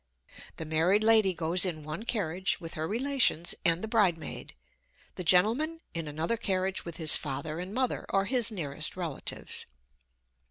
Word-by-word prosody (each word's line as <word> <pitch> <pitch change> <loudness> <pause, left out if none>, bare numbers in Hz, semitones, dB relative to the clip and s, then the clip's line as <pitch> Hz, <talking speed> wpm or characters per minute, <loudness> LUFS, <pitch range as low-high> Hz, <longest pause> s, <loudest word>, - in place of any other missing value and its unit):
The 160 - -5
married 165 +7 +2
lady 220 -3 +5
goes 170 +2 +2
in 165 -5 -1
one 155 +9 -6
carriage 190 -5 -1
with 165 -1 -8
her 155 +1 -3
relations 240 - 0
and 170 +2 +3
the - - -2
bridemaid; 195 -8 -1 0.6
the 180 - -6
gentleman 235 - +2
in 165 -2 -4
another 160 +10 -2
carriage 190 -3 -1
with 170 -1 -7
his 160 -2 +7
father 150 +3 -4
and 180 +2 -6
mother, 255 +3 -2
or 195 0 +1
his 235 0 +3
nearest 155 -4 -3
relatives. 165 -6 -4
180 Hz, 155 wpm, -29 LUFS, 160-220 Hz, 0.6 s, his